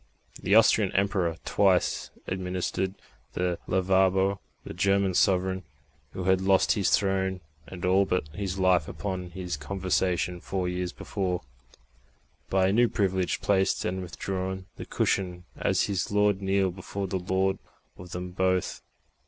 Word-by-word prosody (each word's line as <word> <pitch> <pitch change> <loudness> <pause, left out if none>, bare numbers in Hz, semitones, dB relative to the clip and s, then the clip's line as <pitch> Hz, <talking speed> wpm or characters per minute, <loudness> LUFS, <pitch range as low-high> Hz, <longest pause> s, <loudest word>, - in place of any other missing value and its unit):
The 100 - +3
Austrian 110 -3 +5
Emperor 95 -4 +1
twice 95 -3 +2 0.2
administered 95 +1 -2 0.4
the 90 -1 -1
Lavabo; 95 +1 +2 0.2
the - - -7
German 100 +2 +2
sovereign, 95 +1 +2 0.5
who 95 - -4
had 95 0 +3
lost 95 0 +3
his 100 - +2
throne 95 -1 +1 0.3
and 90 -2 -6
all 95 +2 +4
but 90 -5 -1
his 95 +3 -4
life 95 -4 +3
upon 95 -3 -4
his 90 -2 -4
conversion 90 +1 -1
four 95 -2 -2
years 90 0 -2
before, 90 -3 -3 1.1
by 95 0 +3
a - - +1
new 120 +2 +5
privilege 95 -2 0
placed 95 -1 +1
and 95 +1 -2
withdrew 95 +1 -4
the - - -7
cushion, 90 -2 -1
as - - +1
his 95 -3 -1
Lord 105 -1 +2
kneeled 95 -2 +1
before 100 +1 -5
the 95 0 -2
Lord 95 +1 0 0.4
of 90 0 -11
them 90 +1 -5
both. 95 0 0
95 Hz, 140 wpm, -27 LUFS, 90-95 Hz, 1.1 s, Austrian